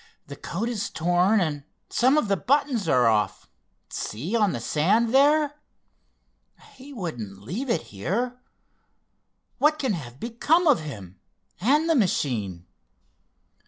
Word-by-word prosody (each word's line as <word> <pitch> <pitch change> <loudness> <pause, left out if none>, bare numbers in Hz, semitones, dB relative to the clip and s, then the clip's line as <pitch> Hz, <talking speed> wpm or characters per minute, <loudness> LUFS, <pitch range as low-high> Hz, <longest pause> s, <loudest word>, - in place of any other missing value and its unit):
The - - -9
coat 205 +7 -4
is 230 -4 -3
torn 175 +6 +2
and 150 -5 -2 0.3
some 260 +4 +3
of 300 - +1
the 200 - +2
buttons 255 - 0
are 125 -1 +4
off—see, 115 - -3
on 210 -4 +3
the 120 - -3
sand 205 - +1
there. 295 +2 +3 1.1
He 275 -2 -13
wouldn't 120 - -6
leave 210 - -4
it 230 - +1
here. 240 - -2 1.2
What 300 +1 +3
can 260 -7 -1
have 130 -7 -7
become 290 +9 +1
of 295 -5 +5
him, 100 - -9 0.4
and 290 - +2
the 330 - +3
machine?" 115 - -1
205 Hz, 125 wpm, -25 LUFS, -, 1.2 s, of